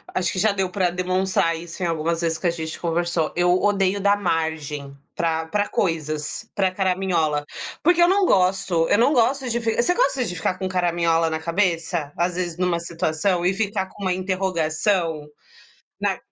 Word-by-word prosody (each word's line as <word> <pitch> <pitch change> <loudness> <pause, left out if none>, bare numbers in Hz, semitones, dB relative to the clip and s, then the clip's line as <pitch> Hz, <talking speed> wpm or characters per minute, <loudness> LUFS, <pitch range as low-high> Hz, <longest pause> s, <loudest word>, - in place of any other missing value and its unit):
acho 180 -2 +1
que 185 - -3
já 215 +2 +3
deu 195 -1 0
pra 185 -2 +1
demonstrar 185 -1 0
isso 170 +2 -7
em - - +2
algumas 165 0 -1
vezes 165 -1 0
que 175 - 0
a - - +4
gente 160 -2 -5
conversou, 170 -1 0
eu 175 0 +3
odeio 200 -1 +1
dar 200 +1 +3
margem 155 -6 -2 0.2
pra 160 -1 0
pra 205 +4 0
coisas, 155 +3 -2
pra 190 -3 +2
caraminhola, 180 -6 0 0.4
porque 350 +1 +4
eu 345 - +7
não 390 +2 +3
gosto, 180 - +2
eu - - +4
não 245 +7 +4
gosto 260 +2 +2
de 235 - 0
fi 225 -1 0
você 240 +9 +2
gosta 315 - +1
de 180 -4 -4
ficar 180 +2 -1
com 190 - -4
o 185 - -1
caraminhola 170 -2 +1
na 160 0 -2
cabeça? 170 -2 -1
Às 175 0 0
vezes 175 -2 -3
numa 180 -2 +1
situação 170 +1 -1
e 185 - +3
ficar 200 -1 -1
com 205 - -11
uma 185 -1 +1
interrogação, 180 -3 -1 0.7
na - - 0
180 Hz, 190 wpm, -23 LUFS, 165-195 Hz, 0.7 s, eu